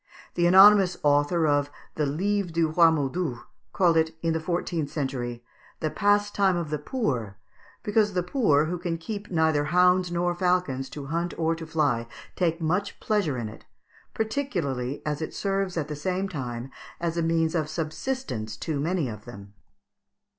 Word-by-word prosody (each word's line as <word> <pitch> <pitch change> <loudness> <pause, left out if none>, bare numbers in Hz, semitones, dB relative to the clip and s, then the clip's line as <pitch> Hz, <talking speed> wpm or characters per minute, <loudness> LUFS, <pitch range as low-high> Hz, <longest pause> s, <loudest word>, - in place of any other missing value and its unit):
The 175 0 +2
anonymous 190 0 +7
author 145 +3 +3
of 145 -1 +2 0.2
the 150 -2 0
"Livre 195 +6 0
du 165 -1 +1
Roy 165 +1 +6
Modus" 145 -2 -1 0.3
called 170 -3 +3
it, 160 0 +1
in 165 -1 +1
the 160 - 0
fourteenth 165 -2 -2
century, 125 -5 -4 0.4
the 155 -2 -1
pastime 205 -2 +2
of 165 -3 -4
the 150 - -1
poor, 125 - -2 0.5
"because 210 -1 +2
the 180 -1 0
poor, 175 - +2
who 175 +2 -3
can 175 -1 -2 0.4
neither 160 -4 +2
keep - - -4
hounds 180 0 +4
nor 175 0 0
falcons 175 -7 0
to 145 -2 -7
hunt 170 +4 -2
or 165 0 +1
to 165 -1 -7
fly, 145 -8 0 0.3
take 165 -2 0
much 180 +5 -1
pleasure 200 -11 0
in 115 -2 -3
it, 110 - -12 0.5
particularly 170 - -2
as 150 0 -2
it 160 - -5
serves 195 -2 -1
at 155 -3 -1
the 150 - -5
same 185 +5 -2
time 130 -6 -5 0.3
as 170 -1 -2
a 170 - 0
means 165 -1 +1
of 155 -3 -1
subsistence 155 - -4
to 150 +4 -3
many 165 0 0
of 110 -2 -8
them." 100 -4 -11
165 Hz, 170 wpm, -26 LUFS, 145-180 Hz, 0.5 s, anonymous